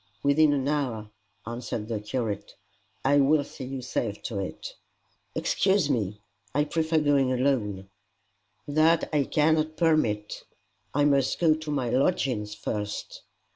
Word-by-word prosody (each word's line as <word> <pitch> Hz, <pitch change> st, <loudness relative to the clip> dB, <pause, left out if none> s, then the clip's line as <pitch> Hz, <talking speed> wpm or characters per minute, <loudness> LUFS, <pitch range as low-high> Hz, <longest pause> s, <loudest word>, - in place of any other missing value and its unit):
"Within 145 Hz, +2 st, +4 dB
an 140 Hz, -2 st, 0 dB
hour," 125 Hz, -8 st, -2 dB, 0.3 s
answered 115 Hz, -2 st, -4 dB
the 110 Hz, -2 st, -2 dB
curate. 105 Hz, -1 st, -4 dB, 0.5 s
"I 140 Hz, +2 st, +4 dB
will 145 Hz, +1 st, +4 dB
see 135 Hz, -1 st, -9 dB
you 130 Hz, 0 st, -5 dB
safe 110 Hz, -4 st, -3 dB
to 105 Hz, -4 st, -3 dB
it." 95 Hz, -, -6 dB, 0.6 s
"Excuse 190 Hz, -6 st, +2 dB
me; 105 Hz, -5 st, -2 dB, 0.3 s
I 145 Hz, -, +4 dB
prefer 160 Hz, +1 st, 0 dB
going 145 Hz, -4 st, +3 dB
alone." 120 Hz, -7 st, 0 dB, 0.8 s
"That 155 Hz, +3 st, +3 dB
I 145 Hz, -2 st, +2 dB
cannot 155 Hz, +1 st, +1 dB
permit." 135 Hz, -11 st, +1 dB, 0.5 s
"I 145 Hz, +1 st, +2 dB
must 140 Hz, -2 st, +2 dB
go 165 Hz, -3 st, +4 dB
to 155 Hz, 0 st, -6 dB
my 130 Hz, -5 st, -1 dB
lodgings 125 Hz, -, 0 dB
first." 105 Hz, -1 st, -4 dB
135 Hz, 135 wpm, -27 LUFS, 110-150 Hz, 0.8 s, Within